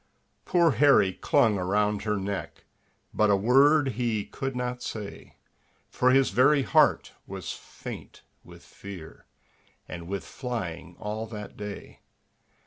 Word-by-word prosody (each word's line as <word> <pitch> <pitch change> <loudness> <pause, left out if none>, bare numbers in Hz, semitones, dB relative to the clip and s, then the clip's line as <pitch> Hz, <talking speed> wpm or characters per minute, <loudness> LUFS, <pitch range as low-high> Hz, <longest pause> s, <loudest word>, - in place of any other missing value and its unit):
Poor 170 -3 +3
Harry 135 -8 +4
clung 105 +2 +2
around 105 +3 0
her 105 -1 -1
neck, 95 -4 -5 0.5
But 105 0 +3
a 100 - +5
word 135 +7 +4
he 115 -3 -1
could 135 -1 -5
not 125 0 -3
say, 105 -4 -7 0.6
For 125 - +2
his 135 +1 +4
very 135 +6 +4
heart - - +3 0.2
was - - -6
faint - - -10 0.2
with - - -15
fear, 95 -5 -11 0.6
And 85 -1 -8
with 100 +1 -4
flying 90 -9 -5
all 110 +2 -4
that 105 -2 -8
day. 105 -1 -8
110 Hz, 130 wpm, -27 LUFS, 100-125 Hz, 0.6 s, a